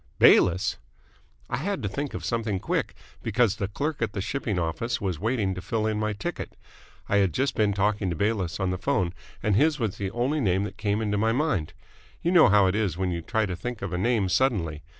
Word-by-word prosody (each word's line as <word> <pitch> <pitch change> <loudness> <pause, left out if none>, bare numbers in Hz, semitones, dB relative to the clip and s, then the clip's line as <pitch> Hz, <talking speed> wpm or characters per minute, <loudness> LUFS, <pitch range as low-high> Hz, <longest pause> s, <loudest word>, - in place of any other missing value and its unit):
"Bayliss!" 90 +3 +5 0.7
"I - - -2
had 185 - -2
to - - 0
think 140 +8 -4
of - - -5
something 115 -5 -1
quick, - - -2 0.3
because 115 -4 +1
the 100 - -1
clerk 145 +9 -3
at 110 -3 -1
the 100 - -3
shipping 110 0 -2
office 85 +8 -1
was 95 -7 -2
waiting 110 -2 0
to 90 - -6
fill 110 +4 -1
in 110 -1 0
my 110 0 0
ticket. 100 - -5 0.5
I 100 - +2
had 95 -6 +2
just 135 0 +1
been 105 -2 +2
talking 100 -1 +1
to 85 - -2
Bayliss 100 -2 -1
on 95 -1 0
the 90 - -3
phone 90 -1 0 0.3
and 105 -2 +2
his 150 +5 +3
was 110 -5 -2
the 100 -1 -2
only 125 +8 0
name 95 -3 +2
that 105 - -6
came 105 +1 0
into 105 -1 0
my 110 +1 +2
mind. 130 - 0 0.5
You 170 - +2
know 175 - +7
how 100 0 +5
it 95 - +2
is 100 -6 0
when 95 -1 0
you 85 -1 -3
try 110 +6 0
to 90 -3 -3
think 120 +5 -6
of 95 -2 -3
a - - 0
name 110 -1 +2
suddenly. 90 - +1
105 Hz, 230 wpm, -26 LUFS, 95-115 Hz, 0.7 s, know